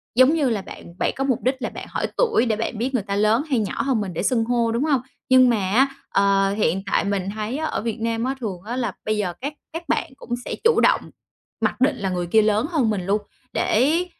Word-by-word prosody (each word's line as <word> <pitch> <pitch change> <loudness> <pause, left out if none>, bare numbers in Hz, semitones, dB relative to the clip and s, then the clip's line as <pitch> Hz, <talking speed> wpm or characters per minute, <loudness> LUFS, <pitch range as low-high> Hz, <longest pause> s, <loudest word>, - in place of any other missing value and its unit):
giống 255 +4 +6
như 295 -6 +2
là 210 -4 -1
bạn 170 - -11
bạn - - +1
có 270 - -1
mục 260 -4 +1
đích 260 +2 +2
là - - -2
bạn - - -8
hỏi - - -2
tuổi 450 - +3
để 225 -3 +1
bạn 225 0 -3
biết 255 +5 -2
người 235 - 0
ta 200 0 -3
lớn 215 +6 +3
hay 255 - +2
nhỏ 210 - -2
hơn 260 -5 +1
mình 190 -3 -4
để 165 - -3
xưng 235 -4 +2
hô, 235 -1 +1
đúng 235 +4 0
hông? 285 -5 +2 0.3
Nhưng 255 -1 +7
mà 235 - +3
á, 265 +6 +5 0.2
ờ, 195 0 +3
hiện 195 -2 +1
tại - - +3
mình 195 -1 -1
thấy 215 +4 -3
á 315 - -2
ở 310 - -2
Việt 230 0 -3
Nam 230 0 -1
á 265 +1 -1
thường 195 -7 -4
á 235 +3 -4
là 235 -6 -2
bây 215 0 0
giờ 185 -4 -1
các 285 +3 -3 0.2
các 330 - -5
bạn 325 -6 0
cũng 240 - -7
sẽ - - -3
chủ 460 -1 +4
động - - +4 0.6
mặc - - -1
định 280 +2 +3
là 200 -4 -2
người 180 -1 -2
kia 220 +5 +5
lớn 215 +1 +2
hơn 280 -9 +2
mình 195 -4 -1
luôn, 205 +2 +1 0.3
để 305 +10 +2
230 Hz, 260 wpm, -23 LUFS, 205-260 Hz, 0.6 s, Nhưng